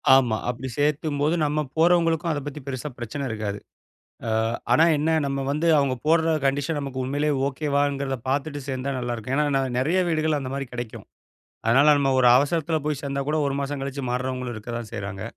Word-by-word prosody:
ஆமா, 120 Hz, -5 st, +3 dB
அப்பிடி 125 Hz, +2 st, -4 dB
சேர்க்கும்போது 150 Hz, +1 st, +1 dB
நம்ம 150 Hz, +1 st, 0 dB, 0.2 s
போறவங்களுக்கும் 165 Hz, -1 st, +3 dB
அத 145 Hz, -, -1 dB
பத்தி 145 Hz, +1 st, -6 dB
பெருசா 135 Hz, +2 st, -4 dB
பிரச்சனை 120 Hz, +4 st, -5 dB
இருக்காது. 105 Hz, -2 st, -3 dB, 0.7 s
அ -, -, 0 dB, 0.4 s
ஆனா, 160 Hz, -, +6 dB
என்ன 155 Hz, +3 st, 0 dB, 0.2 s
நம்ம 140 Hz, 0 st, -2 dB
வந்து 155 Hz, +3 st, 0 dB
அவுங்க 135 Hz, -2 st, +2 dB
போட்ற 165 Hz, 0 st, +3 dB
கண்டிஷன் 145 Hz, +3 st, 0 dB
நமக்கு 135 Hz, -2 st, -4 dB
உண்மையிலேயே 145 Hz, +3 st, 0 dB
ஓகே 145 Hz, +2 st, -4 dB
வாங்கிறத 140 Hz, -2 st, 0 dB
பாத்துட்டு 145 Hz, +1 st, -1 dB
சேர்ந்தா 130 Hz, +1 st, -2 dB
நல்லாயிருக்கும். 120 Hz, +1 st, -3 dB
ஏன்னா, 150 Hz, -, +3 dB
நான் 130 Hz, -2 st, -1 dB
நெறைய 165 Hz, +8 st, +2 dB
வீடுகள் 155 Hz, -1 st, +1 dB
அந்தமாரி 135 Hz, 0 st, -4 dB
கிடைக்கும். 120 Hz, -2 st, -6 dB, 0.6 s
அதனால 135 Hz, +6 st, +5 dB
நம்ம 135 Hz, -1 st, +2 dB
ஒரு 125 Hz, -, +5 dB
அவசரத்துல 160 Hz, +3 st, +1 dB
போய் 150 Hz, -2 st, -1 dB
சேர்ந்தா 140 Hz, 0 st, -2 dB
கூட 155 Hz, +1 st, +1 dB
ஒரு 140 Hz, -, -1 dB
மாசம் 140 Hz, 0 st, -3 dB
கழித்து 140 Hz, 0 st, -4 dB
மாறுறவங்களும் 125 Hz, -1 st, -3 dB
இருக்க 110 Hz, +2 st, -7 dB
தான் 110 Hz, -3 st, -9 dB
செய்றாங்க. 100 Hz, 0 st, -5 dB
140 Hz, 175 wpm, -24 LUFS, 130-150 Hz, 0.7 s, ஆனா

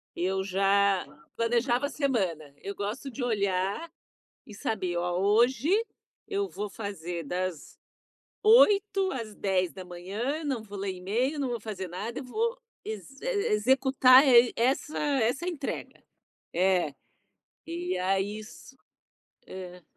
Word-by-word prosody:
eu 190 Hz, +2 st, 0 dB
já 195 Hz, 0 st, +2 dB, 0.3 s
planejava 240 Hz, +3 st, +1 dB
a -, -, -9 dB
semana. 185 Hz, -, -1 dB
Eu 200 Hz, -, -5 dB
gosto 220 Hz, +8 st, -4 dB
de 255 Hz, -, -7 dB
olhar 200 Hz, -, -1 dB, 0.6 s
e 215 Hz, -, -11 dB
saber: 190 Hz, -4 st, -2 dB
"Ó, 175 Hz, +1 st, -1 dB
hoje, 235 Hz, -, +3 dB, 0.6 s
eu 400 Hz, -1 st, -1 dB
vou 205 Hz, -, -5 dB
fazer 175 Hz, -5 st, -5 dB
das 180 Hz, 0 st, -4 dB, 0.6 s
8h 410 Hz, -4 st, +5 dB
às 230 Hz, -6 st, -5 dB
10h, 190 Hz, -, -2 dB
não 270 Hz, -5 st, -1 dB
vou 205 Hz, -1 st, -9 dB
ler 195 Hz, 0 st, -2 dB
email, 225 Hz, +11 st, -1 dB
não 270 Hz, -3 st, -1 dB
vou 235 Hz, -, -3 dB
fazer 200 Hz, -3 st, -5 dB
nada, 210 Hz, +8 st, -5 dB
eu 275 Hz, -, -6 dB
vou 460 Hz, -, -1 dB, 0.3 s
ex 220 Hz, -, -7 dB
e -, -, -10 dB
e 440 Hz, -5 st, 0 dB
executar 260 Hz, +4 st, +6 dB
e 240 Hz, -2 st, +7 dB
essa 265 Hz, +5 st, 0 dB
essa 275 Hz, +1 st, +1 dB
entrega". 310 Hz, -6 st, -5 dB, 0.5 s
É, 180 Hz, -4 st, +2 dB, 0.7 s
e 350 Hz, +2 st, -3 dB
aí 195 Hz, +3 st, 0 dB
isso 220 Hz, +4 st, -12 dB, 0.7 s
é. 180 Hz, -1 st, -9 dB
215 Hz, 130 wpm, -28 LUFS, 190-270 Hz, 0.7 s, e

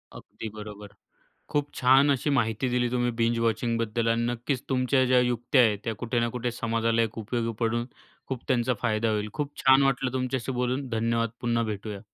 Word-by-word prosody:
अगदी 110 Hz, -, -8 dB
बरोबर. 105 Hz, -1 st, -9 dB, 0.6 s
खूप 145 Hz, -1 st, -1 dB
छान 135 Hz, +3 st, +5 dB
अशी 140 Hz, +2 st, +1 dB
माहिती 115 Hz, -2 st, +1 dB
दिली 125 Hz, 0 st, +1 dB
तुम्ही 120 Hz, 0 st, +1 dB
बिंज 115 Hz, 0 st, +2 dB
वॉचिंग 115 Hz, +1 st, 0 dB
बद्दल 115 Hz, 0 st, -1 dB
आणि 115 Hz, 0 st, +2 dB
नक्कीच 120 Hz, +2 st, -2 dB
तुमच्या 130 Hz, 0 st, +2 dB
ज्या 125 Hz, 0 st, +4 dB
युक्त्या 125 Hz, +2 st, +2 dB
आहेत 105 Hz, -3 st, +2 dB
त्या 115 Hz, -, -2 dB
कुठे 120 Hz, 0 st, 0 dB
ना 120 Hz, -, +1 dB
कुठे 120 Hz, 0 st, -1 dB
समाजाला 115 Hz, 0 st, 0 dB
एक 115 Hz, 0 st, -3 dB
उपयोगी 115 Hz, +1 st, -2 dB
पडून 120 Hz, +1 st, 0 dB, 0.4 s
खूप 130 Hz, -2 st, -4 dB
त्यांचा 125 Hz, -1 st, +2 dB
फायदा 110 Hz, -1 st, +1 dB
होईल. 105 Hz, 0 st, -1 dB
खूप 145 Hz, -1 st, -4 dB
छान 135 Hz, +1 st, +7 dB
वाटलं 135 Hz, -2 st, +1 dB
तुमच्याशी 130 Hz, 0 st, -2 dB
बोलून. 125 Hz, +2 st, -1 dB
धन्यवाद. 115 Hz, 0 st, 0 dB
पुन्हा 120 Hz, -1 st, +1 dB
भेटूया. 105 Hz, 0 st, -6 dB
120 Hz, 185 wpm, -27 LUFS, 115-130 Hz, 0.6 s, छान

